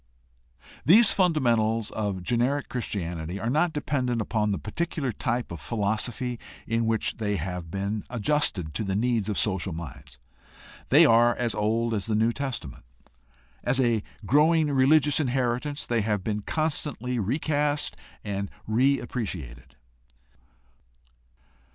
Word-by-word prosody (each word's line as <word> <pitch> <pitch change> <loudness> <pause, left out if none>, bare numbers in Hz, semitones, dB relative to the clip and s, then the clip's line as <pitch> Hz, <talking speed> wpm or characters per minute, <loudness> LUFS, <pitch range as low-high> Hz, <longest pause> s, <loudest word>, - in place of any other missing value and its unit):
These 210 - +7
fundamentals 115 - +2
of 100 -4 -3
generic 125 +7 0
Christianity 90 -6 -3
are 110 +4 -1
not 155 +4 +2
dependent 130 -5 -1
upon 110 -1 0
the 100 - 0
particular 145 +2 -3
type 120 -1 -2
of 85 - -7
philosophy 115 +3 -2 0.3
in 115 0 0
which 115 -1 0
they 105 -2 -1
have 90 -3 -4
been 100 +3 -3
adjusted 115 - 0
to 90 - -2
the 95 -2 -2
needs 115 -1 +1
of 105 - -2
social 95 -3 -1
minds. 70 -6 -9 0.7
They - - +7
are 120 +1 +5
as 120 -3 -1
old 110 +3 0
as 100 -2 -2
the 110 - 0
New 115 +2 +2
Testament. 125 - -5 0.8
As 125 +2 +1
a 120 -4 +2 0.2
growing 150 - +4
religious 140 +2 +4
inheritance 130 +1 -1
they 120 -2 0
have 105 -2 -1
been 105 0 -2
constantly 145 -3 -2
recast 145 - 0 0.3
and 100 -1 -3 0.2
reappreci 115 - 0
ated. - - -17
115 Hz, 130 wpm, -26 LUFS, 105-135 Hz, 0.8 s, These